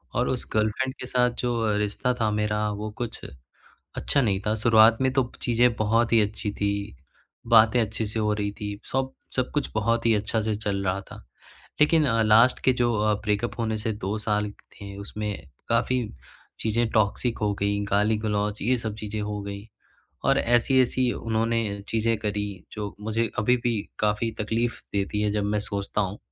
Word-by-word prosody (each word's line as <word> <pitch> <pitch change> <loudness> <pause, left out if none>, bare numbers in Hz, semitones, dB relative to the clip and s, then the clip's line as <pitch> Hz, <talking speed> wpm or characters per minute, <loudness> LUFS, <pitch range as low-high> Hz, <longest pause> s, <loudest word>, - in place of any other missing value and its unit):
और 125 +2 +1
उस 125 - -3
गर्लफ्रेंड 110 +5 0
के - - -5
साथ 125 -1 +2
जो 115 -3 0
रिश्ता 105 +5 0
था 110 - +3
मेरा 105 0 0
वो 105 +1 -4
कुछ 120 -1 -4 0.8
अच्छा 140 - +1
नहीं 100 -4 +1
था। 105 - +2
शुरुआत 110 +1 +5
में 130 -1 +2
तो 130 -2 +1
चीज़ें 120 0 +3
बहुत 115 +2 +2
ही 115 - +6
अच्छी 105 0 -1
थी, 100 -4 -2 0.5
बातें 115 +1 +6
अच्छे 110 0 -2
से 110 +2 -4
हो 105 -1 +1
रही 105 -1 -2
थी, 105 0 -6
सब 130 0 0 0.2
सब 130 -1 0
कुछ 145 -2 0
बहुत 115 +2 +1
ही 115 - +5
अच्छा 110 +2 0
से 110 0 -1
चल 100 -2 -2
रहा 95 +1 0
था। - - -9 0.7
लेकिन 155 0 +5
अ, 115 -2 +2
लास्ट 110 +3 +5
के 130 - +5
जो 120 -1 +1
अ, 105 0 +2
ब्रेकअप 105 +4 -1
होने 110 -1 0
से 110 +1 -2
2 105 +3 -1
साल 105 -1 +1
थे 100 -1 -12
उसमें 105 +1 -4 0.4
काफ़ी 125 +2 +2 0.6
चीज़ें 115 +2 +1
टॉक्सिक 110 +3 +1
हो 105 -1 +1
गई, 100 0 +1
गाली-गलौच 105 0 +1
ये 125 +4 +2
सब 110 -3 -4
चीज़ें 110 0 -4
हो 105 0 -3
गई। 100 +1 -7 0.6
और - - +4
ऐसी-ऐसी 125 +1 +3
उन्होंने 115 +1 0 0.3
चीज़ें 115 0 +1
करी 105 -1 -2 0.3
जो 105 -2 -5
मुझे 110 +2 0
अभी 125 +4 +3
भी 120 - +2 0.3
काफ़ी 105 +2 +1
तकलीफ़ 115 +3 -1
देती 100 +1 -1
है, 105 - +1
जब 105 -1 0
मैं 105 +1 0
सोचता 100 0 -3
हूँ। 100 0 -2
110 Hz, 180 wpm, -25 LUFS, 105-120 Hz, 0.8 s, ही